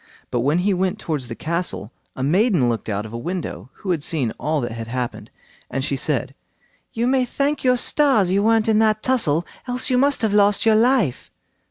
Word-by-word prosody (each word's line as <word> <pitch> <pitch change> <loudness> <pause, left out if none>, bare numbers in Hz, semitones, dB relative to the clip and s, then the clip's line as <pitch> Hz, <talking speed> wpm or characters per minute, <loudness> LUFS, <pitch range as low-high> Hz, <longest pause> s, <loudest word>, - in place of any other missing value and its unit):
But 120 - 0
when 145 +7 +1
he 205 - +3
went 185 0 -1
towards 150 -6 -3
the 115 - -6
castle, 170 - -1 0.2
a 130 - -4
maiden 175 - +2
looked 115 -1 -2
out 105 0 -2
of 110 - -10
a - - -4
window 155 - -5
who 190 - -4
had 165 -4 0
seen 140 -7 -1
all 155 +1 0
that 120 - -3
had 115 0 -6
happened, 125 0 -4 0.4
and 135 +1 -2
she 140 - -1
said: 135 -1 -2 0.6
"You 230 0 -1
may 260 0 +2
thank 280 +3 -1
your 250 -1 +3
stars 245 -8 +2
you 195 +2 +2
weren't 225 +1 +2
in 220 -1 +3
that 215 -1 +2
tussle, 175 - +1 0.2
else 250 +1 -2
you 250 - +3
must 280 -2 +2
have 215 -2 +1
lost 205 0 +3
your 220 - +5
life." 230 - +2
180 Hz, 210 wpm, -21 LUFS, -, 0.6 s, your